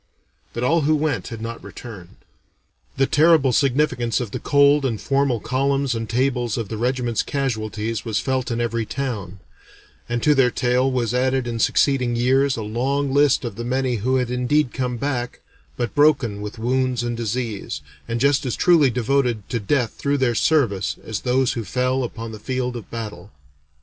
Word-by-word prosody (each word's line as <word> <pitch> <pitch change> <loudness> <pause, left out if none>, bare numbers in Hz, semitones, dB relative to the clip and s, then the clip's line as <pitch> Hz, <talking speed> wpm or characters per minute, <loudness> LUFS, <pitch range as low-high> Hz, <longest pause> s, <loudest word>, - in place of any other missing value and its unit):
But 120 - -3
all 165 +6 +3
who 155 +2 +3
went 155 0 -1
had 115 -4 -7
not 115 0 -6
returned. 100 -8 -10 0.8
The 135 - +4
terrible 150 -2 +4
significance 125 -4 +1
of 120 -5 -4
the - - -4
cold 140 0 +4
and 115 -5 -1
formal 135 -3 +1
columns 135 +2 0
and 115 -2 -4
tables 125 -2 0
of 115 -4 -4
the 110 - -4
regiment's 120 -1 0
casualties 110 -5 -3
was 110 -4 -1
felt 130 -2 -1
in 115 -1 -2
every 115 -1 -1
town, 105 -7 -4 0.7
and 120 0 -2
to 150 - +5
their 135 -3 +4
tale 125 +2 +1
was 120 -3 -1
added 130 0 +1
in 115 -1 -3
succeeding 125 0 +2
years 130 +3 +2
a 110 - -3
long 135 +6 -1
list 140 -2 +3
of 115 -3 -5
the 120 - -4
many 125 0 0
who 125 +5 0
had 125 -2 0
indeed 125 +2 +1
come 125 -2 -2
back, 125 -2 -3 0.4
but 120 - -2
broken 135 -9 +3
with 105 +3 -6
wounds 125 +1 0
and 120 0 -2
disease, 115 -2 -3 0.3
and 115 0 -2
just 140 +2 +3
as 125 -4 -2
truly 170 -7 +4
devoted 125 -3 0
to 120 - 0
death 115 +3 0
through 145 0 -1
their 130 -3 +1
service 115 -7 +1
as 110 - -4
those 130 +1 +1
who 115 -4 -3
fell 130 +3 0
upon 115 -1 -6
the 110 - -9
field 125 +1 -3
of 120 - -8
battle. 105 -5 -7
125 Hz, 180 wpm, -22 LUFS, 115-135 Hz, 0.8 s, to